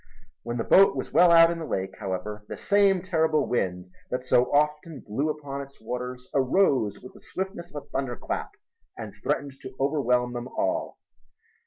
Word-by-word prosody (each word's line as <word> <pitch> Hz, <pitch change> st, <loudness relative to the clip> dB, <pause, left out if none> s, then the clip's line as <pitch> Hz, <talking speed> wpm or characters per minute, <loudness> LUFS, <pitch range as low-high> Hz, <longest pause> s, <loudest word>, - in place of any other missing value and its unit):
When 120 Hz, +1 st, -4 dB
the 115 Hz, -, -1 dB
boat 195 Hz, +1 st, +6 dB
was -, -, -5 dB
well 175 Hz, 0 st, +6 dB
out 165 Hz, 0 st, +7 dB
in 170 Hz, -, -4 dB
the 160 Hz, -, -5 dB
lake, 95 Hz, -6 st, -3 dB
however, 105 Hz, +1 st, -4 dB
the -, -, -5 dB
same 200 Hz, -3 st, +3 dB
terrible 160 Hz, -4 st, +1 dB
wind 90 Hz, -6 st, -2 dB, 0.2 s
that 125 Hz, 0 st, -3 dB
so 125 Hz, -1 st, +4 dB
often 150 Hz, 0 st, 0 dB
blew 135 Hz, +9 st, -1 dB
upon 145 Hz, -2 st, -5 dB
its 140 Hz, 0 st, -12 dB
waters 125 Hz, +2 st, -6 dB
arose 135 Hz, -, +2 dB
with 125 Hz, -, -12 dB
the -, -, -16 dB
swiftness 190 Hz, -2 st, -5 dB
of 145 Hz, -, -5 dB
a -, -, -24 dB
thunderclap 135 Hz, -4 st, -4 dB, 0.5 s
and -, -, -7 dB
threatened 140 Hz, -1 st, -2 dB
to 130 Hz, -, -9 dB
overwhelm 125 Hz, -4 st, +1 dB
them 120 Hz, 0 st, -5 dB
all. -, -, -1 dB
135 Hz, 175 wpm, -26 LUFS, 120-160 Hz, 0.5 s, out